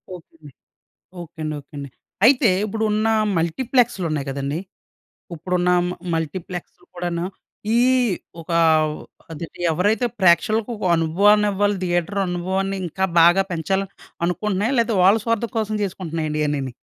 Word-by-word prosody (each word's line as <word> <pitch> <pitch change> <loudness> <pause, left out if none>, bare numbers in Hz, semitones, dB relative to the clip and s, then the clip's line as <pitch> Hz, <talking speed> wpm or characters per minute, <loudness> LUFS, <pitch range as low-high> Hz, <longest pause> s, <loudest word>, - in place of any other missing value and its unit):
Okay 175 - -13
అండి. 150 -2 -14 0.7
Okay 170 0 -13
అండి. 155 0 -3
Okay 140 - -35
అండి. 140 -1 -6 0.4
అయితే 250 -3 +5 0.2
ఇప్పుడు 220 +1 -3
ఉన్న 215 +1 +1 0.3
మల్టీప్లెక్స్‌లు 230 +4 +1
ఉన్నాయి 150 -2 -3
కదండీ! 140 +3 -3 0.8
ఇప్పుడున్న 180 +2 -1 0.2
మ - - -2 0.2
మల్టీప్లెక్స్‌లు 165 +2 -5
కూడాను, 175 -1 -3 0.5
ఈ - - +4 0.6
ఒక 165 - -9 0.8
ఆదేటి 165 +2 -8
ఎవరైతే 205 +8 +1
ప్రేక్షకులకు 215 +5 +3
ఒక 205 - -4
అనుభవాన్ని 200 +6 +3
ఇవ్వాలి, 205 +1 +1
థియేటర్ 175 +2 -1
అనుభవాన్ని 190 +2 -2
ఇంకా 190 +3 -1 0.2
బాగా 175 +3 +6
పెంచాలి 190 +4 -1 0.4
అనుకుంటున్నాయా 205 +7 -1
లేకపోతే 230 -3 +1
వాళ్ళ 195 +4 +6
స్వార్థం 230 0 -1
కోసం 215 -1 -1
చేసుకుంటున్నాయండి 165 -5 -3
ఇయన్నీని. 140 -4 -2
180 Hz, 130 wpm, -21 LUFS, 165-210 Hz, 0.8 s, బాగా